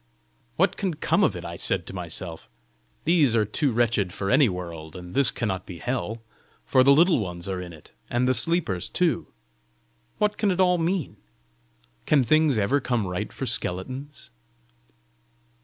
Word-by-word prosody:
"What 190 +4 +2
can 190 -5 -2
come - - +1
of - - +2
it?" - - -7
I - - -6
said - - 0
to - - -9
myself. 85 -2 -6 0.6
"These 155 -8 +4
are 110 -2 +3
too 130 +7 0
wretched 115 -5 +1
for 95 +2 -3
any 135 -2 +5
world, 85 -4 -7
and 90 -1 -9
this 140 -1 +5
cannot 95 -6 -3
be 90 - -8
hell, 115 0 -3 0.4
for 130 -1 +4
the 140 - +6
Little 165 +2 +5
Ones 90 -3 -5
are 95 -1 -3
in 90 -1 -8
it, 80 -3 -15 0.2
and 120 +1 +1
the 130 - +3
sleepers 125 - 0
too! 170 -8 0 0.9
What 210 0 0
can 210 - +2
it 185 -1 -1
all 180 -1 +4
mean? 165 - -1 0.9
Can 145 -3 +4
things 155 +1 +3
ever 110 +8 +2
come 120 -4 -1
right 90 -1 -4
for - - -5
skeletons?" 130 +9 -4
120 Hz, 170 wpm, -25 LUFS, 95-150 Hz, 0.9 s, the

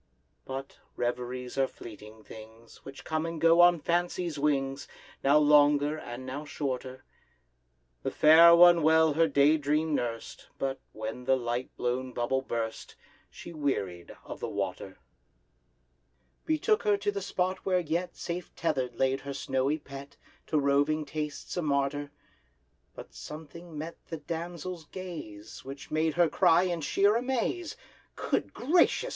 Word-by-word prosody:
But 135 +1 -7 0.2
reveries 125 +1 -3
are 135 - +3
fleeting 110 -2 -12
things, 110 +1 -13
Which 135 0 -10
come 160 0 -2
and 165 -1 -5
go 165 +1 +5
on 175 -1 +6
Fancy's 175 -1 -1
wings, 140 -1 0 0.4
Now 140 +2 +5
longer, 145 0 +4
and 130 -4 -8
now 135 +3 -5
shorter: 130 -3 -5 1.0
The - - -2
Fair 165 +2 +7
One 175 0 +7
well 160 0 +4
her 165 +2 +3
day 145 +1 +4
dream 150 +2 0
nurst, 115 -4 -4
But, 135 0 -2
when 110 +3 -6
the 135 +1 +4
light 120 +1 -3
blown 125 +1 -2
bubble 120 +3 0
burst, 115 -3 -5 0.3
She 170 - -11
wearied 100 - -3
of - - -8
the - - -4
water; 95 -1 -4 1.5
Betook 370 +8 +2
her 420 -2 +2
to 410 +1 -1
the 405 -1 -4
spot 185 - -1
where 185 -1 +2
yet 170 +2 -2
Safe 175 +1 -6
tether'd 130 -7 -1
lay 135 +1 +1
her 140 0 -7
snowy 135 +2 0
pet, 140 -1 -11 0.3
To 155 - 0
roving 145 +2 +2
tastes 150 0 -5
a - - +1
martyr: 145 -1 -1 0.9
But - - -11
something 160 +2 -10
met 160 +3 -6
the 165 - -5
damsel's 170 +2 -6
gaze, 145 - -9
Which 135 +1 -9
made 155 0 0
her 175 -1 +4
cry 165 +2 +4
in 175 -3 -2
sheer 200 +8 +2
amaze, 265 +8 -2 0.4
"Good - - -2
gracious! 325 +8 +2
145 Hz, 145 wpm, -29 LUFS, 130-170 Hz, 1.5 s, Fair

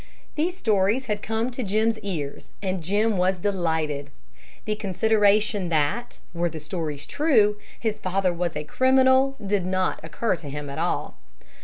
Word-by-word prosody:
These 345 +4 -1
stories 215 - +2
had 210 -3 -2
come 225 +3 -1
to 255 - -4
Jim's 220 +1 +1
ears, 165 -9 -5
and 190 -2 -2
Jim 205 +5 +1
was 185 +1 +2
delighted. 160 -7 -1 0.6
The 215 - 0
consideration 205 -1 +2
that, 160 +9 0 0.2
were 170 0 0
the 160 0 -7
stories 150 -2 -4
true, 225 -9 +3 0.2
his 220 -2 -2
father 185 0 0
was 170 -2 -2
a 150 - -2
criminal 260 - +4
did 195 -1 +1
not 185 0 0
occur 170 +5 -1
to 150 -4 -8
him 145 0 -5
at - - -5
all. - - -2
195 Hz, 155 wpm, -25 LUFS, 170-220 Hz, 0.6 s, criminal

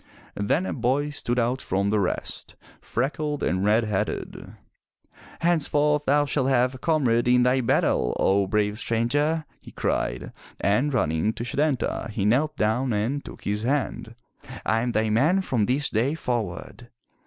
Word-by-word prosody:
*' - - -28
Then 135 - 0
a - - -3
boy 135 +4 0
stood 125 -4 -3
out 125 +2 0
from 100 +2 -1
the 105 - +2
rest, 95 - -3 0.3
freckled 145 +3 -2
and 95 +1 0
red 110 +3 +3
headed. 105 -3 -3 0.9
"Henceforth 150 -3 +2
thou 145 +2 +3
shalt 135 -2 0
have 125 -1 +2
a 130 - -10
comrade 130 -7 +1
in 125 0 +4
thy 125 +1 +3
battle, 60 - +1
O 100 0 +2
brave 105 +1 0
stranger,'' 145 +9 0 0.2
he - - -12
cried, - - -2 0.3
and 125 +9 +1
running 95 - 0
to 120 - -5
Setanta, 135 -2 -1
he 105 -2 -2
knelt 135 +8 +1
down 120 +4 +1
and 120 +8 -1
took - - -11
his 105 +1 -1
hand. 125 -2 -2 0.3
" 135 - -12
I 115 0 +2
am 120 0 -2
thy 110 -1 +1
man 155 - +3
from 120 - 0
this 135 +3 +1
day 125 +8 +1
forward!" 115 - -4
120 Hz, 165 wpm, -25 LUFS, 105-145 Hz, 0.9 s, in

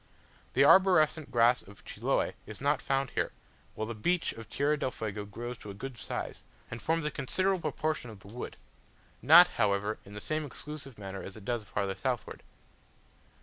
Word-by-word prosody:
The - - +5
arborescent 160 -5 +5
grass 120 +1 +4
of 100 +1 -16
Chiloe - - 0
is 105 -1 -8
not 140 +1 +1
found 135 -1 0
here; - - -1 0.4
while 110 - -2
the 115 - -4
beech 175 +11 0
of 115 -1 -10
Tierra 145 +2 +1
del 140 - -1
Fuego 105 -4 -5
grows 120 +4 -6
to 105 - -9
a 100 - -7
good 130 +5 -6
size, - - -5 0.3
and 115 - -5
forms 165 -1 0
a 150 - 0
considerable 185 +7 0
proportion 155 -5 -2
of 105 -3 -11
the - - -14
wood; 120 +5 -7 0.6
not, 165 +8 +9
however, 100 +2 0
in 100 +1 -12
the - - -5
same 155 +8 -2
exclusive 145 -2 -6
manner 95 -1 -6
as 95 +2 -8
it 105 - -12
does 120 -2 -2
farther 100 -1 -2
southward. - - -3
125 Hz, 185 wpm, -31 LUFS, 105-150 Hz, 0.6 s, not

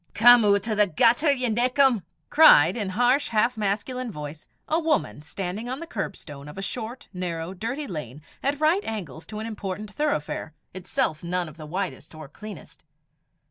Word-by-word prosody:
"Come 240 +1 +8
oot 200 0 +3
o' 220 - 0
the 210 -1 +3
gutter, 240 - +4
ye 255 -3 0
nickum!" 250 +1 +3 0.3
cried, 185 - +7
in 210 -5 -2
harsh, 245 +8 +2
half 235 +2 +2
masculine 220 +4 -2
voice, 150 -2 -8 0.2
a 320 - +2
woman 310 - 0
standing 195 +8 -5
on 260 +2 -4
the 335 - -6
curbstone 160 - -6
of 150 - -11
a - - -4
short, 235 +4 -5
narrow, 175 -1 -4
dirty 230 +10 -4
lane, 150 - -7 0.2
at 280 +1 0
right 325 +6 +3
angles 170 -9 -6
to 215 - -7
an 215 - -4
important 205 -1 -5
thoroughfare, 160 - -2 0.2
itself 175 -4 -2
none 175 0 -1
of 155 - -12
the 155 -2 -9
widest 175 -2 -4
or 155 -2 -9
cleanest. 205 +4 -11
210 Hz, 175 wpm, -25 LUFS, 175-245 Hz, 0.3 s, Come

